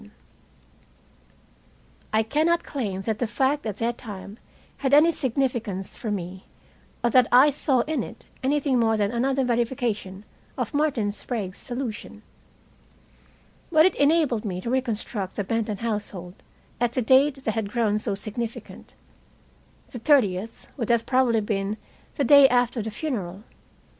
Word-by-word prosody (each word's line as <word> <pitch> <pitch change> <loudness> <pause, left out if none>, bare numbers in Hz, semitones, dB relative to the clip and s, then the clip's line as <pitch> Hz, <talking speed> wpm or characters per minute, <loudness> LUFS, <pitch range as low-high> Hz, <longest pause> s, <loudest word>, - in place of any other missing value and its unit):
I 220 +1 +3
cannot 315 +8 +1
claim 205 -9 -3
that 220 0 -2
the 245 - 0
fact 270 +3 0
at 210 -2 -4
the 235 +1 0
time 210 -3 -9 0.4
had 270 0 +3
any 320 +3 +6
significance 235 - -2
for 225 - -5
me, 185 -2 -5 0.6
or 240 - +2
that 250 0 +5
I 265 +4 +7
saw 270 -2 +1
in 300 0 -1
it 230 - -9 0.2
anything 275 -1 +1
more 225 -1 +2
than 205 -1 +1
another 265 +3 +1
verification 235 -5 -2 0.3
of - - -3
Martin 280 -8 +1
Sprague's 205 -3 -5
solution. 240 -4 -5 1.5
But 315 0 +6
it 375 - +3
enabled 285 -6 +3
me 185 -4 -3
to 235 - -3
reconstruct 225 -6 -2
the 205 - -1
Benton 220 0 -2
household 205 -5 -4 0.5
at 240 0 +1
the 255 - 0
date 270 +3 +4
that 220 - -1
had 220 -2 -2
grown 215 -2 +1
so 210 -2 -2
significant. 225 +3 -7 1.0
The 245 - -6
30th 225 -6 +1
would 230 -4 -3
have 235 -1 +2
probably 255 -4 +2
been 205 0 -2 0.4
the 285 - 0
day 280 +1 +8
after 245 -1 +1
the 220 - -4
funeral. 210 - -4
235 Hz, 145 wpm, -25 LUFS, 210-265 Hz, 1.5 s, day